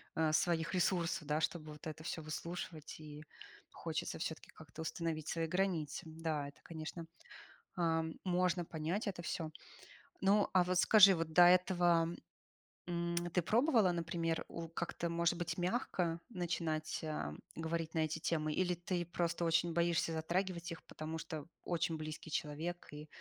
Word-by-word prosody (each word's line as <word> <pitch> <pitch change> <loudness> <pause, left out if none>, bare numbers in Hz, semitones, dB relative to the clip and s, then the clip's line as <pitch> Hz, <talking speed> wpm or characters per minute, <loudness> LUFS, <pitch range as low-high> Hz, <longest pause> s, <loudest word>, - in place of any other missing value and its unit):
э, 160 -1 +3
своих 165 +1 +2
ресурсов, 170 -4 +1
да, 150 +1 +2
чтобы 155 -5 -2
вот 150 +2 -9
это 155 0 -6
всё 165 -1 -3
выслушивать, 155 0 -5
и 150 0 -9 0.5
хочется 160 -2 -3
всё-таки 160 -1 -4
как-то 160 0 -10
установить 160 -1 -2
свои 165 -1 0
границы. 180 -4 0
Да, 160 -2 -2
это, 145 - -13
конечно, 165 +1 -6 0.7
э, 165 -2 +2 0.2
можно 180 -1 +2
понять 165 +8 -2
это 180 -3 -3
всё. 160 -1 -3 0.7
Ну, 200 +1 +4
а 185 -1 +5
вот 180 0 +1
скажи, 200 -2 +8
вот 165 -1 -2
до 175 - +8
этого, 175 -2 +5 0.8
м, 170 0 -1 0.2
ты 180 - +3
пробовала, 225 - +4
например, 165 -1 -1
у 165 -1 -6
как-то 170 0 -3
может 170 0 +2
быть 170 -1 -2
мягко 175 -4 0
начинать, 165 -5 -2
а, 75 - -3 0.2
говорить 165 0 -2
на 160 - 0
эти 155 0 +1
темы, 155 -1 0
или 180 +1 +2
ты 175 0 -2
просто 170 0 -1
очень 165 0 +3
боишься 170 -1 +2
затрагивать 170 +1 -1
их, 165 - -6
потому 160 +1 -5
что 155 -3 -5 0.2
очень 165 -2 0
близкий 155 +1 -6
человек 160 +4 -3
и 150 +1 -8
165 Hz, 155 wpm, -36 LUFS, 160-175 Hz, 0.8 s, скажи